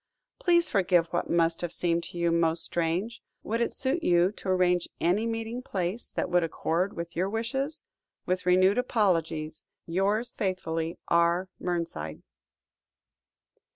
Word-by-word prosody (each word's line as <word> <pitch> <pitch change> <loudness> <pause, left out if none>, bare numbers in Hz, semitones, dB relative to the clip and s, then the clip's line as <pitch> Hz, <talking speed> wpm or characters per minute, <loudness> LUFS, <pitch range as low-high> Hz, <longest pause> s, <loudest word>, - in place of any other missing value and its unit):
Please 345 -1 +4
forgive 180 -4 +3
what 175 - -1
must 165 -1 +2
have 175 -2 -3
seemed 170 -1 +1
to - - -8
you 170 0 +2
most 165 0 +2
strange. 175 +7 -1 0.2
Would 230 +2 -1
it 235 - +1
suit 270 +6 -1
you 175 - +3
to 200 - -7
arrange 180 -1 +2
any 200 +7 +2
meeting 225 +2 -3
place 190 0 -3
that - - -2
would 175 -1 +2
accord 165 +3 -1
with 170 0 -6
your 185 +3 0
wishes? 270 +8 -2 0.4
With 180 0 -1
renewed 185 +4 +5
apologies. 165 -10 0 0.2
"Yours 200 +7 0
faithfully, 165 -4 -2
"R. 170 +2 +2
MERNSIDE." 165 - -3
180 Hz, 140 wpm, -28 LUFS, 170-215 Hz, 0.4 s, renewed